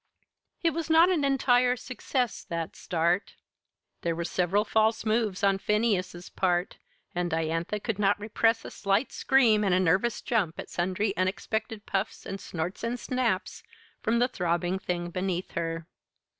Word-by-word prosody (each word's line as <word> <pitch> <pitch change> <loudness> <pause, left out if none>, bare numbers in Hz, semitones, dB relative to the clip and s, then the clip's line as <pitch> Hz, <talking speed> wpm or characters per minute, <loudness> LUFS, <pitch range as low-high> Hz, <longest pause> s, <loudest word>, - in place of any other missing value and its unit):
It 335 - +4
was 330 +1 -4
not 330 +3 +6
an 325 -6 +1
entire 250 -2 +3
success 250 0 -2
that 170 -3 -4
start. 175 +2 0 0.7
There 170 -1 -1
were 170 - -2
several 185 +5 +1
false 220 +1 +2
moves 215 -3 0
on 195 -1 +3
Phineas's 195 -5 0
part, 180 -1 0 0.3
and 175 0 -1
Diantha 165 +5 -1
could 220 -3 -3
not 205 0 +3
repress 225 +2 +1
a - - -7
slight 200 +5 0
scream 230 -6 +4
and 190 -3 +3
a - - +3
nervous 185 +6 +1
jump 190 -9 0
at - - -7
sundry 190 +4 -1
unexpected 210 +3 -2
puffs 195 - -2
and 195 0 -5
snorts 175 +5 -4
and 240 +1 -2
snaps 235 -8 -1 0.4
from 230 +1 +1
the 245 +1 +3
throbbing 175 -2 -1
thing 175 -2 -3
beneath 185 0 -2
her. 165 -1 -3
200 Hz, 155 wpm, -28 LUFS, 175-230 Hz, 0.7 s, not